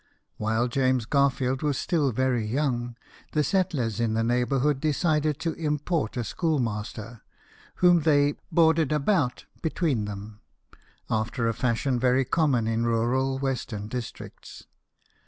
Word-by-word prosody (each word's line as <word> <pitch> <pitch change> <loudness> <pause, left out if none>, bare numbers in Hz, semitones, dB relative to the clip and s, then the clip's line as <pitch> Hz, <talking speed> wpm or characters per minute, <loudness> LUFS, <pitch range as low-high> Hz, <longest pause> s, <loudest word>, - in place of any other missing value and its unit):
While 110 +3 0
James 130 -1 +1
Garfield 135 -1 +1
was 145 -3 0
still 150 -6 +1
very 125 -1 0
young, 120 0 -1 0.4
the 150 - +2
settlers 140 - 0
in 115 -2 0
the 115 - +1
neighbourhood 130 +4 +1
decided 155 -1 +1
to 165 -1 -1
import 150 -4 -2
a 120 - -1
schoolmaster, 115 -6 -3 0.5
whom 175 -1 +5
they 145 -2 +3
" - - -39
boarded 160 -3 +3
about 150 -3 +1
" - - -30
between 155 - 0
them, 105 +1 -8 0.7
after 115 +2 -1
a 115 - +1
fashion 125 +2 0
very 130 +1 +2
common 135 -6 +1
in 115 +1 0
rural 120 +3 +1
western 125 -6 -3
districts. 120 +1 -8
130 Hz, 135 wpm, -26 LUFS, 115-150 Hz, 0.7 s, whom